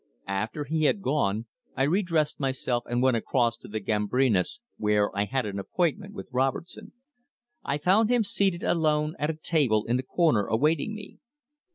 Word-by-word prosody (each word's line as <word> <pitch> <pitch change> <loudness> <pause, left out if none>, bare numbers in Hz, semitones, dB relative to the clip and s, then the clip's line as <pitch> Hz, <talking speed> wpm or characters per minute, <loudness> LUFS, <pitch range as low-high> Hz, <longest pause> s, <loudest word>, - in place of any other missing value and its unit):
After 110 +9 -2
he 155 +2 0
had 195 +6 +1
gone, 115 - 0 0.3
I 135 - +2
re 170 +9 +2
dressed 160 -5 0
myself 130 -3 -1
and 120 +1 0
went 130 -3 +4
across 120 0 +1
to - - -13
the 110 +1 -4
Gambrinus, 105 - +1 0.2
where 105 -1 +1
I 100 +1 +1
had 130 +2 -1
an 100 -1 -4
appointment 185 - -2
with - - -7
Robertson. 135 +7 -2 0.7
I 140 - -1
found 195 +8 +3
him 245 -2 +3
seated 195 -3 0
alone 155 -2 +1
at 150 +1 0
a 160 - -2
table 140 -9 +1
in 120 +2 +1
the - - -1
corner 130 - +1
awaiting 150 - +1
me. 210 -2 -10
135 Hz, 175 wpm, -27 LUFS, 115-165 Hz, 0.7 s, went